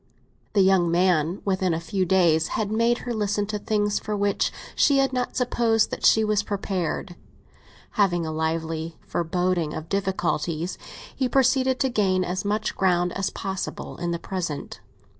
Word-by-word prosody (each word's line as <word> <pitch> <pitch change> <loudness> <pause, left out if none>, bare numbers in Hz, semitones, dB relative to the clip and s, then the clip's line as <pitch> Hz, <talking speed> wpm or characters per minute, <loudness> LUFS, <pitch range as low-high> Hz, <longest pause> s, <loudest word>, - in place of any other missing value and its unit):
The 200 - +5
young 190 -3 +4
man, 175 0 +2
within 185 -3 +1
a - - -2
few 185 +2 -1
days, 165 -4 +3
had 210 -1 -1
made 230 +2 +2
her 245 - -2
listen 205 -1 0
to 210 0 -3
things 205 0 0
for 210 -1 -3
which 200 0 +1 0.2
she 280 -2 +4
had 270 -1 +2
not 250 -1 -2
supposed 235 -3 +2
that - - +2
she 220 - +5
was 210 -1 +2
prepared; 195 -3 -3 0.8
having 175 -5 +1
a 160 - -3
lively 160 +1 -2
foreboding 175 -1 -1
of 160 +1 -7
difficulties, 175 -4 -1 0.4
he 260 -2 0
proceeded 260 0 +3
to 265 - +2
gain 190 -5 +1
as 185 +1 -2
much 210 +2 -1
ground 180 -2 +2
as 195 0 -1
possible 190 -1 -5
in 175 0 -3
the 170 - -1
present. 170 -5 -5
190 Hz, 160 wpm, -25 LUFS, 170-215 Hz, 0.8 s, The